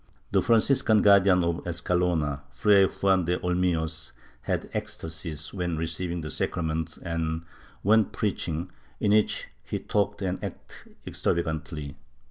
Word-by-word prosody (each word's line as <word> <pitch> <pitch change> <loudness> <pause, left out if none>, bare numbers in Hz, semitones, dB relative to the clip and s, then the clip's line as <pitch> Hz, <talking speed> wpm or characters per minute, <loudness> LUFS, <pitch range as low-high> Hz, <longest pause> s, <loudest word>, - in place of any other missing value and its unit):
The - - +4
Franciscan 115 -1 +3
Guardian 100 -3 +6
of 85 -1 0
Escalona, 85 -4 0
Fray 100 +9 +5
Juan 95 -2 +1
de 90 +1 +1
Olmillos, 85 -3 -1 0.3
had - - -2
ecstasies 80 -2 -5
when 90 -4 -2
receiving 85 +2 -2
the 75 - -5
sacrament 80 -1 -2
and 80 -1 -2 0.4
when 110 +2 +5
preaching, 90 -4 -2 0.3
in 105 - +2
which 105 0 +2
he - - -3
talked 100 0 -1
and 95 0 -2
acted - - -9
extravagantly. 80 -3 -2
85 Hz, 120 wpm, -27 LUFS, 80-95 Hz, 0.4 s, Guardian